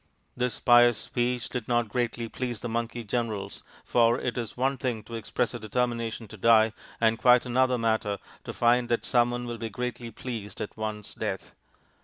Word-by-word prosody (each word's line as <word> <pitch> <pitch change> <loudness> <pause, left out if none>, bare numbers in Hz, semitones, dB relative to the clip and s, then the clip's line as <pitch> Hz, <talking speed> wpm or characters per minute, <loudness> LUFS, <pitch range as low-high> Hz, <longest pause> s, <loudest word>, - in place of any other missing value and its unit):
This 125 -2 -1
pious 120 -1 +6
speech 120 +2 -1
did 125 -4 -5
not 120 -1 +2
greatly 120 0 -1
please 120 -1 -4
the - - -3
monkey 115 +1 -3
generals, 110 -2 -3 0.2
for 120 0 +3
it 125 - -2
is 115 -2 -4
one 135 +2 +1
thing 120 -5 -2
to 115 - -12
express 115 +2 -1
a 120 - -5
determination 115 0 -2
to 105 - -10
die, 110 +1 +5 0.3
and 115 0 +3
quite 125 0 +6
another 125 +1 +2
matter 110 -3 0 0.3
to - - -4
find 120 0 +2
that 120 - 0
some 120 -1 +3
one 120 0 -3
will 120 -1 -5
be 115 0 -3
greatly 125 +1 -4
pleased 115 -4 -6
at - - -5
one's 110 -1 -5
death. - - -4
120 Hz, 185 wpm, -27 LUFS, 110-125 Hz, 0.3 s, pious